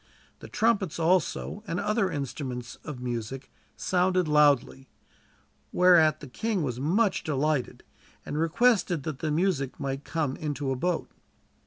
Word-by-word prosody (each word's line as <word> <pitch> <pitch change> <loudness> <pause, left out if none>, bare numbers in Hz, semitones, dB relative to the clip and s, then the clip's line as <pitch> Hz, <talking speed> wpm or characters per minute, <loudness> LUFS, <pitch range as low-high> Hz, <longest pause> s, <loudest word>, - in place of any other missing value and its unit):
The - - -10
trumpets 210 -7 +1
also, 180 +4 0
and 170 - -2
other 210 -2 +1
instruments 135 -5 -5
of 150 -5 -7
music, 125 +2 -5 0.3
sounded 180 -1 +1
loudly, 145 -3 +3 0.8
whereat 175 -4 +5
the 145 - -8
king 205 - -2
was 125 -4 -3
much 190 - +1
delighted, 150 -2 -1 0.4
and - - -5
requested 175 - +2
that 150 -3 -5
the 160 - -2
music 150 -4 0
might 135 0 -3
come 150 -5 -2
into 145 -3 -3
a - - 0
boat. 175 +6 -2
155 Hz, 135 wpm, -27 LUFS, 135-180 Hz, 0.8 s, whereat